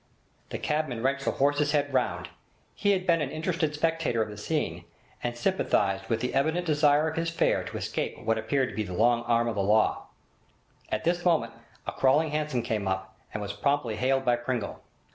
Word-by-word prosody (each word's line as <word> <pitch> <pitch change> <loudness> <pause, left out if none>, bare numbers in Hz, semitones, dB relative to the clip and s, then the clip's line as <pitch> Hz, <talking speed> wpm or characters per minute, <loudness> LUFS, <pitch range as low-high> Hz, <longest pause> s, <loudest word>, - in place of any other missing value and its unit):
The - - -3
cabman 150 -6 -1
wrenched 140 +1 0
the - - +2
horse's 145 +2 +2
head 145 -2 +1
round. 130 -1 0 0.4
He 205 - 0
had 185 -1 -1
been 165 -3 +3
an 140 - -1
interested 155 0 -1
spectator 155 -7 +1
of 110 - -7
the 105 - -8
scene, 150 +9 -2 0.4
and 120 0 -3
sympathised 100 - +1
with 115 -1 0
the 125 - -2
evident 160 +6 +1
desire 150 -1 +4
of 160 - -4
his 165 0 0
fare 165 - +1
to - - -5
escape - - -3
what 115 0 +1
appeared 130 +3 0
to - - -9
be 110 - -1
the 95 -4 -4
long 120 +5 +3
arm 120 0 +2
of 115 - 0
the 100 - -1
law. 105 +3 +2 0.8
At - - -1
this 175 +1 +1
moment 160 -10 +2 0.3
a - - -2
'crawling' 145 +4 +3
hansom 150 -5 -1
came 110 -4 -2
up, 95 0 -3 0.2
and 105 - -4
was 100 0 -4
promptly 125 +1 0
hailed 135 +1 +1
by 120 -1 +3
Pringle. 120 -3 -3
135 Hz, 200 wpm, -28 LUFS, 115-155 Hz, 0.8 s, desire